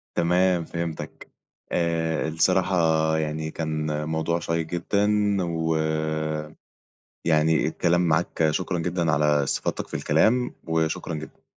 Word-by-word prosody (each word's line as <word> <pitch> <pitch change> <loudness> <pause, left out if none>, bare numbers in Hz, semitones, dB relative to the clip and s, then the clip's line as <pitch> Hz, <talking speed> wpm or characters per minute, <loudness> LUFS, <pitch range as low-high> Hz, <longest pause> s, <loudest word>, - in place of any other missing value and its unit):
تمام، 90 0 +2
فهمتك. 85 -1 -6 0.4
آآ 80 -2 0
الصراحة 90 +3 +2 0.4
يعني 80 0 -2
كان 75 -2 -2
موضوع 80 +1 0
شيّق 85 -1 -1
جدًا، 90 +5 0 0.4
و 80 -1 -1 1.5
يعني 80 -1 +3
الكلام 85 +2 +1
معاك 85 -1 +1
شكرًا 90 +2 -2
جدًا 85 -1 0
على 75 -1 +3
استفاضتك 70 - -2
في - - -18
الكلام، 125 +2 +2
وشكرًا 80 +2 -1
جدًا. 75 0 -9
80 Hz, 110 wpm, -25 LUFS, 80-85 Hz, 1.5 s, يعني